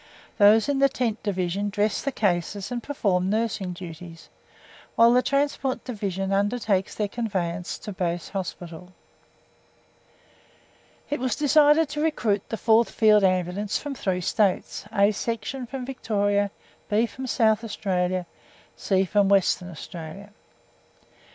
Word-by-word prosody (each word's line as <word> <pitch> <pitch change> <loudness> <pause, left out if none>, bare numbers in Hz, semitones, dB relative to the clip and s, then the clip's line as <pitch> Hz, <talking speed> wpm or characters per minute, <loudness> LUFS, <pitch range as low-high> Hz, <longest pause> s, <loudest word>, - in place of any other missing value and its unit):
Those 215 +3 +6
in 285 -1 0
the 275 0 +5
Tent 235 -4 -2
Division 195 0 -1
dress 205 +1 0
the 275 - -2
cases 195 0 -1
and 240 -1 -3
perform 195 -9 0
nursing 215 -3 -1
duties, 170 -1 -10 0.7
while 230 +1 +6
the 250 - +5
Transport 275 -1 -1
Division 195 -5 -3
undertakes 205 -1 0
their 210 - -1
conveyance 185 -6 -3
to 210 - -8
Base 175 -3 -3
Hospital. 180 -2 -7 2.2
It 290 - -1
was 255 -3 -1
decided 300 +1 +4
to 295 +1 -3
recruit 230 -10 +1
the 225 - -3
Fourth 225 +1 +3
Field 215 -2 +4
Ambulance 185 +2 0
from 290 -1 -5
three 190 -8 -2
States, 200 0 0
A 200 +1 +3
Section 230 +4 -4
from 260 0 -6
Victoria, 205 -5 0 0.4
B 215 +3 +3
from 260 +4 -7
South 220 -2 +2
Australia, 185 -4 -1 0.5
C 190 -1 +1
from 200 +1 +2
Western 190 -2 +2
Australia. 170 +4 -9
205 Hz, 130 wpm, -25 LUFS, 185-235 Hz, 2.2 s, Those